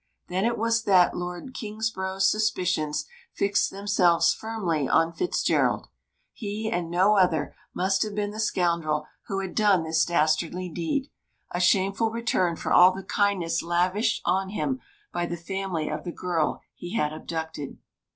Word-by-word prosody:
Then 185 +3 0
it 235 0 +1
was 230 +1 +1
that 185 -3 +5
Lord 180 +8 -5
Kingsborough's 200 -3 -1
suspicions 185 -8 0 0.3
fixed 200 0 +1
themselves 195 -4 +3
firmly 185 -11 -2
on 165 +1 +3
Fitzgerald. 360 - 0 0.4
He 215 0 -4
and 175 -1 -2
no 190 +5 +3
other 180 -5 +2 0.2
must 190 +1 +1
have 210 -2 -1
been 205 -1 -1
the 215 - -8
scoundrel 170 -7 0 0.2
who 195 -1 -2
had 190 -2 -5
done 205 -6 +3
this 160 0 +2
dastardly 170 +2 0
deed 180 - -2 0.4
a 175 - -2
shameful 195 +4 +2
return 220 -7 0
for - - -2
all 180 +1 +8
the 190 +1 -7
kindness 185 -6 0
lavished 180 +6 +1
on 190 +2 +1
him 260 +6 -2 0.3
by 175 0 -1
the 170 - -4
family 175 -2 -3
of 150 0 -4
the 175 - -4
girl 170 -3 -1
he 175 +5 -7
had 150 -8 0
abducted. 160 -2 -5
185 Hz, 150 wpm, -26 LUFS, 170-210 Hz, 0.4 s, all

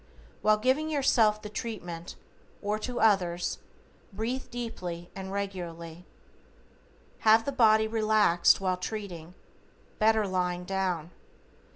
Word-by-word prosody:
While 215 0 +4
giving 260 +7 +1
yourself 230 -7 +3
the - - -5
treatment, 180 -6 -6 0.5
or 210 +1 -1
to 245 +2 -4
others, 180 -5 +2 0.5
breathe 225 +6 -3
deeply 180 -8 -6
and 190 -1 -6
regularly. 175 -4 -5 1.1
Have 220 +1 +5
the 280 - -1
body 220 -4 +4
relaxed 215 -5 +3
while 185 -1 0
treating, 180 -4 -6 0.6
better 220 -1 +3
lying 180 -1 -1
down. 180 -3 -2
205 Hz, 105 wpm, -28 LUFS, 180-220 Hz, 1.1 s, Have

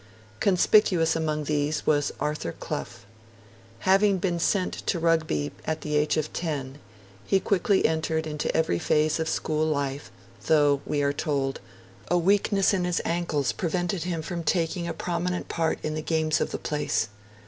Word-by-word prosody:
Conspicuous 185 -3 +4
among 155 -2 -1
these 150 +1 -1
was 145 -2 +2
Arthur 150 - -2
Clough. - - -6 0.8
Having 195 +1 +4
been 175 -1 -1
sent 185 +2 +1
to 180 - +1
Rugby 160 - +1
at 160 -1 -2
the 150 0 -2
age 150 +1 +2
of 155 -1 -2
ten, 145 -5 -4 0.4
he 195 - +2
quickly 195 0 +2
entered 160 0 0
into 150 -1 -2
every 160 - +1
phase 155 - +2
of 160 0 -1
school 155 -1 0
life, 140 -2 -2 0.4
though, 145 -3 +4
we 145 -1 0
are 140 0 +1
told, 140 -3 -2 0.5
'a 175 - +2
weakness 195 +2 +3
in 185 -2 +1
his 175 -1 0
ankles 165 -6 0
prevented 175 +1 -2
him 170 -3 -2
from 170 +1 -4
taking 170 +1 0
a 170 - -2
prominent 175 +1 -2
part 165 -1 0
in 155 - -1
the 155 - -3
games 160 -1 0
of - - 0
the - - -3
place'. 150 -7 -1
160 Hz, 160 wpm, -26 LUFS, 150-175 Hz, 0.8 s, Conspicuous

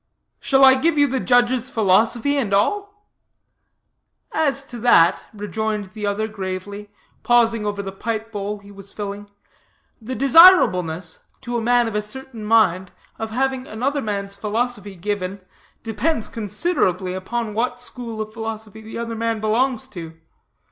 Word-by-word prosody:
"Shall 270 -1 +4
I 265 - +8
give 305 +4 +1
you 290 - +5
the 265 -1 -1
judge's 245 0 +2
philosophy, 225 +5 +2
and 220 -8 +1
all?" 410 - -1 1.2
"As 275 -3 0
to 245 -3 -9
that," 190 -8 +5
rejoined 210 -1 -3
the 210 -2 -4
other 205 +2 -1
gravely, 200 0 -6 0.3
pausing 230 -3 +2
over 205 -1 -3
the 195 - -5
pipe 220 +3 -4
bowl 205 0 -4
he 200 0 -15
was 200 0 -12
filling, 205 0 -6 0.7
"the 250 +4 -5
desirableness, 215 - +5 0.2
to 245 -2 -5
a 235 - 0
man 240 +1 +3
of 225 - -4
a 210 - 0
certain 235 +1 -9
mind, 190 -4 +2 0.3
of 225 - -3
having 260 +2 -1
another 275 +6 -2
man's 200 -3 -4
philosophy 210 -1 -3
given, 195 +1 -3 0.4
depends 225 +4 -1
considerably 205 - -1
upon 215 +4 -3
what 245 +3 -1
school 235 -3 -7
of 215 0 -6
philosophy 220 -1 -6
that 220 +1 -8
other 230 -1 -4
man 225 0 -1
belongs 230 +3 0
to. 165 -2 -9
220 Hz, 150 wpm, -21 LUFS, 205-245 Hz, 1.2 s, I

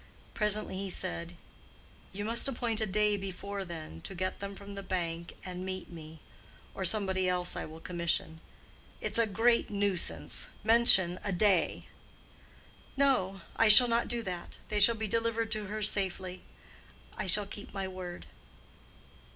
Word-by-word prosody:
Presently 210 -2 0
he 195 0 -4
said, 85 - -3 0.8
"You 205 +2 -5
must 230 +4 +4
appoint 235 -4 -1
a 220 - 0
day 210 +1 +1
before 195 +1 -5
then, 160 - -9
to 190 - -8
get 185 +1 -3
them 200 0 -6
from 200 +1 -10
the 200 - -6
bank 170 -3 -4
and 180 0 -6
meet 185 -1 -6
me—or 160 +3 -12
somebody 190 -1 +3
else 180 -1 -1
I - - -4
will 160 +1 -11
commission;—it's 170 +4 -4
a 230 - +3
great 230 +3 +2
nuisance. 190 - -2 0.2
Mention 205 -6 +5
a 200 - -2
day." 190 -1 +1 1.1
"No; 195 -9 +1
I 225 - +4
shall 230 +4 +11
not 235 0 +1
do 235 -1 -1
that. 180 -3 -6
They 210 - 0
shall 230 +3 +6
be 220 -1 -3
delivered 230 +1 -1
to 215 -1 -3
her 215 +2 -4
safely. 190 -2 +1 0.7
I - - -4
shall 205 +3 +4
keep 205 +1 -10
my 195 -1 -4
word." 185 -2 -8
195 Hz, 150 wpm, -30 LUFS, 180-215 Hz, 1.1 s, shall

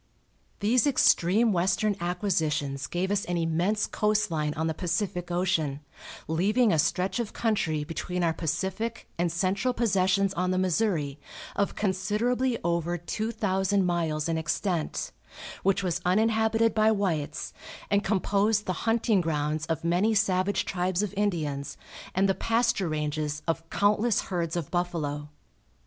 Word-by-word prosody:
These 230 +5 +3
extreme 220 -4 +4
western 190 +4 +1
acquisitions 155 -7 -1
gave 185 +6 -2
us 205 0 +1
an 175 0 -1
immense 170 +6 +1
coast 210 -3 0
line 150 -2 0
on 160 +1 -1
the 160 - 0
Pacific 175 +1 -2
Ocean, 175 -6 0 0.5
leaving 205 - +2
a 160 - +2
stretch 180 +8 +1
of 235 -3 -3
country 165 -10 0
between 180 +3 -3
our 165 -1 +2
Pacific 190 +8 -3
and 175 -1 +1
central 195 +8 0
possessions, 195 -3 +2
on 180 0 -1
the 185 - +1
Missouri, 180 -6 0 0.4
of 200 - 0
considerably 220 +6 0
over 170 0 0
two 215 +6 -3
thousand 195 -2 +1
miles 165 -3 0
in 165 -1 0
extent, 165 +1 -2 0.5
which 195 +1 +1
was 180 -1 -1
uninhabited 220 +3 +2
by 215 0 +4
whites, 165 -8 -2 0.4
and 200 0 +3
composed 205 +1 +1
the 185 - -1 0.2
hunting 225 -3 +3
grounds 155 -1 -1
of 165 -2 -2
many 180 +6 +2
savage 200 -1 +1
tribes 185 +1 0
of 205 - -3
Indians 150 -9 -2 0.4
and 190 +1 +3
the 195 - +3
pasture 225 -5 +1
ranges 150 0 -2
of 165 0 -2
countless 210 +2 +2
herds 170 -3 -3
of 170 -5 -3
buffalo. 155 -5 -2
185 Hz, 140 wpm, -27 LUFS, 165-210 Hz, 0.5 s, extreme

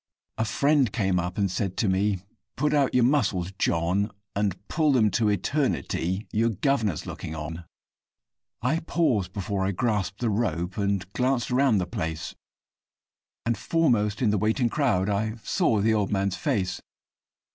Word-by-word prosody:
A 110 - +2
friend 140 +2 +2
came 95 -4 +1
up 90 +1 -3
and 100 -3 +1
said 95 -1 -2
to 110 - +1
me, 95 0 +1 0.3
'Put 150 0 +1
out 140 -4 +2
your 125 - +5
muscles, 95 -9 +1
John, 90 +6 +1 0.3
And 100 -2 0
pull 155 -3 +2
them 110 -5 +4
to 105 +3 +2
eternity 105 - -1
your 115 +2 +2
guvnor's 110 - 0
looking 80 - -6
on.' 80 +2 -6 1.0
I 145 +7 +2
paused 125 - 0
before 100 0 -2
I 95 - +1
grasped 105 -1 -1
the 120 -3 0
rope, 95 -5 -1
and 100 -2 0
glanced 125 -1 0
around 130 -3 +3
the 90 - 0
place, 85 -4 -4 1.1
And, 115 0 +1
foremost 120 -10 +1
in 110 - +3
the 105 - +1
waiting 115 +4 +1
crowd, 115 -10 +1
I 105 +2 -1
saw 105 -3 +1
the 110 +2 +3
old 105 -3 0
man's 100 -1 0
face. 95 -3 -1
105 Hz, 155 wpm, -26 LUFS, 95-120 Hz, 1.1 s, your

